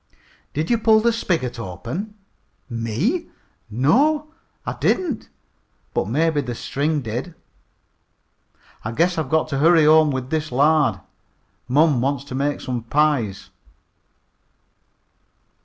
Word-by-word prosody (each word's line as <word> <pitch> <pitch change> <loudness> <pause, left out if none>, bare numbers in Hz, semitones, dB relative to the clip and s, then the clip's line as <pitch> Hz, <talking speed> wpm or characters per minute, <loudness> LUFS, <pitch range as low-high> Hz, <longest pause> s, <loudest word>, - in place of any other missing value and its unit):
"Did 155 +7 -1
you 235 - +3
pull 220 -1 +5
the 235 +1 +2
spigot 160 - -2
open?" 115 - -6 0.5
"Me? 120 - -2 0.4
No, 280 - +2 0.4
I - - -2
didn't, 320 -11 -1 0.6
but - - 0
maybe 150 +5 +1
the 125 -3 -5
string 145 +5 -1
did. 125 +9 -5 1.5
I 110 - -4
guess 170 +5 +1
I've 150 -5 -3
got 160 +1 +2
to 140 -2 -2
hurry 165 +1 +5
home 155 0 +6
with 130 -2 -4
this 155 -2 -1
lard. 150 +3 +3 0.7
Mom 145 0 +3
wants 140 0 -1
to 140 - -9
make 140 +2 -1
some 125 -2 -3
pies." 120 -6 0
150 Hz, 120 wpm, -21 LUFS, 125-165 Hz, 1.5 s, home